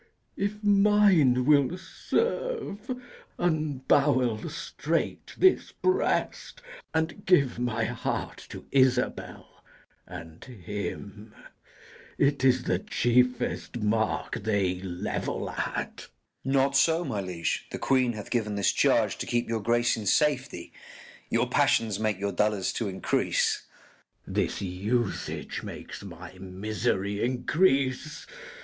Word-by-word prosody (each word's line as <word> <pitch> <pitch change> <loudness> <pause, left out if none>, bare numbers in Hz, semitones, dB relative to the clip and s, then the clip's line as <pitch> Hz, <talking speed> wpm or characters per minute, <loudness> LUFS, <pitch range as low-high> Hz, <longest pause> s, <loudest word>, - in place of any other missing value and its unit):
If 210 +2 -3
mine 200 -11 +4
will 145 +3 +4
serve, 445 - -2 0.5
unbowel 140 -7 +1
straight - - -3
this 375 -1 +3
breast, 380 +5 0 0.3
And 160 +5 -2
give 140 -10 +3
my 115 -2 -1
heart 120 +1 -3
to - - -9
Isabel 130 -2 0 0.5
and 80 -2 -10
him: 105 -1 -7 0.8
It 140 -1 +2
is 130 -1 +4
the 90 - 0
chiefest 125 +3 +1
mark 110 +1 -1
they 100 -4 0
level 90 -2 -3
at. - - -4 0.4
_Gur._Not 135 0 +3
so, 165 +5 +3
my 110 -8 -2
liege: 90 -3 -3
the - - -5
queen 130 -3 +2
hath 110 +1 -8
given 110 -4 0
this 100 -1 +2
charge, - - +2
To - - -4
keep 120 0 0
your 115 -1 -1
grace 120 +2 +2
in 110 -3 -5
safety: 145 +1 +1 0.6
Your - - +1
passions 110 -3 +2
make 110 -3 0
your 100 0 -1
dolours 105 0 +1
to 115 - -1
increase. 95 -1 0 0.6
K. - - -10
Edw. - - -6
This - - 0
usage 100 +4 -2
makes - - -8
my 90 -2 -10
misery 100 +1 -2
increase. 135 +2 +1
120 Hz, 115 wpm, -27 LUFS, 105-145 Hz, 0.8 s, mine